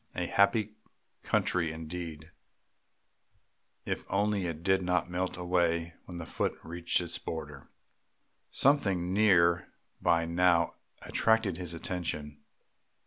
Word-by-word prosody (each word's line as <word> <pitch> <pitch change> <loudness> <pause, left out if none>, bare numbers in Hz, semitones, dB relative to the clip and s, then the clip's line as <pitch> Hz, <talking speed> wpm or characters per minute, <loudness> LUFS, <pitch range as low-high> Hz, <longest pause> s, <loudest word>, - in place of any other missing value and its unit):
A - - -1
happy 105 +2 +2 0.4
country 85 -3 +1
indeed, 80 0 -7 1.5
if - - -2
only 100 -2 +1
it 85 -1 -5
did 95 0 +3
not 90 -1 0
melt 90 +1 -2
away 85 -2 +1
when 90 - -8
the 85 - -6
foot - - -2
reached 85 +1 0
its 85 -2 -5
border. 75 -4 -7 0.8
Something 100 -11 +2
near 90 -5 +4 0.3
by 85 -1 +3
now 85 0 +3 0.3
attracted 110 -6 +2
his 90 -2 -5
attention. 75 -4 -4
90 Hz, 110 wpm, -30 LUFS, 85-95 Hz, 1.5 s, near